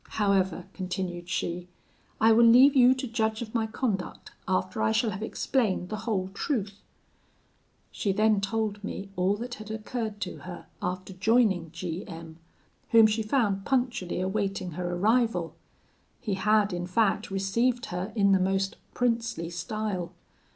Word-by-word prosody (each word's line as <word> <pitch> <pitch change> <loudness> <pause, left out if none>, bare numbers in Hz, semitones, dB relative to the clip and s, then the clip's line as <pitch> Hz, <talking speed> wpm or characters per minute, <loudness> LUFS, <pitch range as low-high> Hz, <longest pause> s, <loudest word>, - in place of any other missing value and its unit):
However,' 190 -4 +1
continued 180 -2 -4
she, 175 -1 -2 0.5
'I 225 +1 +5
will 230 +1 +6
leave 255 +5 +7
you 255 0 +6
to 260 - -4
judge 220 -1 -1
of 215 - -10
my 225 -2 0
conduct, 215 -5 -3 0.2
after 95 +3 -1
I 110 0 +3
shall 220 - +1
have 190 +2 -6
explained 215 -5 -1
the 215 - -3
whole 190 -3 0
truth.' 205 -4 -2 1.1
"She 200 - -1
then 215 +1 +3
told 210 0 -2
me 200 -1 -5
all 185 +3 +2
that 240 +3 -6
had 215 - -9
occurred 220 -1 -4
to 180 - -4
her 180 -1 -9 0.2
after 185 +1 -4
joining 195 -4 +2
G 170 +2 -5
M, 165 -1 -9 0.5
whom 225 -1 +7
she 215 +1 +2
found 215 -4 +1
punctually 245 -9 -1
awaiting 195 -1 -2
her 175 +2 -3
arrival. 215 -3 +1 0.7
He 210 - -3
had 205 +1 +2
in 175 0 -3
fact 210 +2 +1
received 230 +6 0
her 180 +4 -3
in 200 -2 +4
the 190 - +5
most 195 +1 0 0.2
princely 230 -8 -1
style. 185 0 -3
200 Hz, 150 wpm, -28 LUFS, 185-225 Hz, 1.1 s, leave